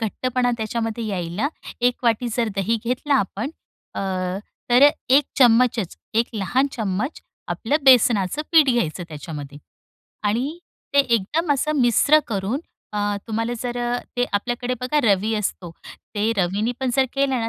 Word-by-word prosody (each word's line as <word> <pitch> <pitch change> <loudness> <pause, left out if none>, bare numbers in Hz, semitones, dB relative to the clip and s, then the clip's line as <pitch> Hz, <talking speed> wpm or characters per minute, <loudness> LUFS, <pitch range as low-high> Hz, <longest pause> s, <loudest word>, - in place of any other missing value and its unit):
घट्टपणा 245 +3 0
त्याच्यामध्ये 225 +1 -3
यायला, 190 +6 -2 0.3
1 245 +1 +1
वाटी 235 +1 +2
जर 235 -2 +1
दही 220 +4 +1
घेतला 255 +4 0
आपण, 220 +2 -1 0.4
अ, - - -3 0.7
तर 260 +4 +8 0.2
1 275 +2 +5
चम्मचच, 235 -5 +4 0.2
1 230 +2 +2
लहान 220 +7 +1
चम्मच, 215 - -3 0.3
आपलं 280 +6 0
बेसनाचं 245 0 +4
पीठ 315 -3 +7
घ्यायचं 180 -7 -1
त्याच्यामध्ये. 145 -2 -8 0.7
आणि 250 +10 -1 0.4
ते 280 - +5
एकदम 275 - 0
असं 285 +2 0
मिश्र 255 +5 +5
करून, 215 +5 -2 0.3
अ, 210 - -2 0.3
तुम्हाला 225 +1 -2
जर 245 0 -3 0.4
ते 245 - +2
आपल्याकडे 245 +4 -1
बघा, 255 +4 0
रवी 215 0 +2
असतो, 190 -4 -3 0.4
ते 210 +2 +1
रवीने 200 +5 0
पण 260 -1 0
जर 265 - +5
केलं 275 -3 +1
ना, 225 - -1
235 Hz, 140 wpm, -22 LUFS, 205-255 Hz, 0.7 s, तर